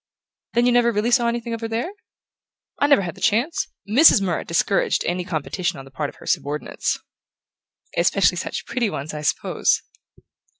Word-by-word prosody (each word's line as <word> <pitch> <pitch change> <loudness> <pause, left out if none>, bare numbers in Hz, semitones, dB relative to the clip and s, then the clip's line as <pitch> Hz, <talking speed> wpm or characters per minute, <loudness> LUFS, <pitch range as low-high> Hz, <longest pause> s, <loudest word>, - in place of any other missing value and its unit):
"Then 240 +1 +3
you 245 - +4
never 240 -1 +4
really 220 +2 0
saw 240 -1 +4
anything 235 0 -2
of 230 - -5
her 225 - -2
there?" 230 +10 -2 0.9
"I 285 - +3
never 280 -9 +5
had 170 -2 -4
the - - -16
chance. 245 +11 +1 0.2
Mrs. 250 +3 +7
Murrett 185 -4 -2
discouraged 170 +3 +1
any 180 +1 -1
competition 175 +3 -3
on 135 - -9
the 135 - -15
part 145 +2 -3
of - - -15
her - - -15
subordinates." 145 +2 -1 1.0
"Especially - - +3
such - - -4
pretty 240 -4 -1
ones, 150 -4 -5
I 150 - -5
suppose?" 150 - +1
210 Hz, 175 wpm, -22 LUFS, 170-240 Hz, 1.0 s, Mrs